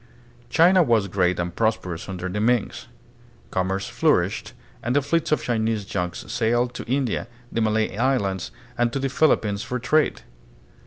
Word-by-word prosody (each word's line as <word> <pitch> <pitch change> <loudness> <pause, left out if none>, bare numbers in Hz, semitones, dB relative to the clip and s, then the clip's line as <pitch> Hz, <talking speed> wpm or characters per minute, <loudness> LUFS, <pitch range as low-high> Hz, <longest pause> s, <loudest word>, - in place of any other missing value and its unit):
China 180 +3 +5
was 115 - +3
great 90 -1 +1
and 85 0 -3
prosperous 100 -7 -1
under 95 -1 -4
the 95 +3 -3
Mings. 120 -1 0 0.6
Com 95 0 0
merce 95 +1 -2
flourished - - +1 0.3
and 120 +2 -1
the 145 - +4
fleets 160 +3 0
of 155 - +2
Chinese 110 -3 0
junks 90 -2 -3
sailed 120 +1 +1
to - - -6
India, 130 -5 0 0.2
the 115 - -1
Malay 110 -2 +1
Islands, 105 -6 0 0.3
and 120 -1 +2
to 140 - -2
the 135 0 -1
Philippines 110 -8 +2
for 125 - -3
trade. 150 +5 +1
110 Hz, 160 wpm, -24 LUFS, 95-125 Hz, 0.6 s, China